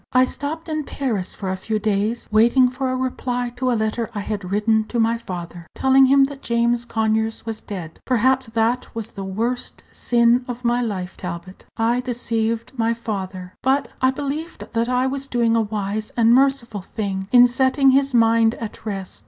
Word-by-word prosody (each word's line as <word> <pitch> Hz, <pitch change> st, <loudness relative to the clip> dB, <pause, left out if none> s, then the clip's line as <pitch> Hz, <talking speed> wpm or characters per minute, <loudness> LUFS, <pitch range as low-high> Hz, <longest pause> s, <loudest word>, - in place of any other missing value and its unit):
I 255 Hz, 0 st, +6 dB
stopped 310 Hz, +5 st, -5 dB
in 310 Hz, -1 st, -2 dB
Paris 230 Hz, -10 st, -3 dB
for 190 Hz, -2 st, -4 dB
a -, -, -1 dB
few 215 Hz, +3 st, -2 dB
days, 215 Hz, +2 st, -1 dB
waiting 235 Hz, +4 st, +5 dB
for 260 Hz, +1 st, -3 dB
a 255 Hz, -, -1 dB
reply 250 Hz, -1 st, -2 dB
to 255 Hz, 0 st, 0 dB
a 235 Hz, -, +1 dB
letter 220 Hz, +1 st, -1 dB
I 205 Hz, -, -2 dB
had 200 Hz, -3 st, -4 dB
written 220 Hz, +2 st, +2 dB
to 235 Hz, -, -3 dB
my 230 Hz, +1 st, +2 dB
father, 175 Hz, -4 st, -7 dB
telling 265 Hz, 0 st, +5 dB
him 275 Hz, +1 st, +5 dB
that 275 Hz, 0 st, -3 dB
James 235 Hz, 0 st, +1 dB
Conyers 220 Hz, -1 st, -1 dB
was 225 Hz, -1 st, -5 dB
dead. 180 Hz, -6 st, -7 dB
Perhaps 260 Hz, +1 st, +2 dB
that 230 Hz, +2 st, +1 dB
was 225 Hz, -1 st, -4 dB
the 195 Hz, -, -7 dB
worst 230 Hz, +6 st, -3 dB
sin 240 Hz, +1 st, +2 dB
of 245 Hz, 0 st, -6 dB
my 240 Hz, +1 st, +2 dB
life, 190 Hz, -6 st, -4 dB
Talbot. 180 Hz, +1 st, -7 dB
I 235 Hz, +2 st, +2 dB
deceived 230 Hz, -2 st, -2 dB
my 230 Hz, -1 st, +1 dB
father; 190 Hz, -5 st, -5 dB
but 270 Hz, +2 st, +1 dB
I 260 Hz, -, +5 dB
believed 290 Hz, +5 st, -5 dB
that 230 Hz, +1 st, 0 dB
I 250 Hz, +1 st, +2 dB
was 275 Hz, +1 st, -2 dB
doing 235 Hz, -3 st, +1 dB
a 230 Hz, -, +3 dB
wise 210 Hz, 0 st, -3 dB
and 230 Hz, 0 st, +5 dB
merciful 260 Hz, -5 st, +2 dB
thing 190 Hz, 0 st, -4 dB
in 245 Hz, -1 st, +8 dB
setting 265 Hz, +2 st, +3 dB
his 275 Hz, +1 st, +3 dB
mind 230 Hz, -1 st, +4 dB
at 225 Hz, -2 st, -8 dB
rest. 195 Hz, -3 st, -5 dB
230 Hz, 185 wpm, -21 LUFS, 215-255 Hz, -, in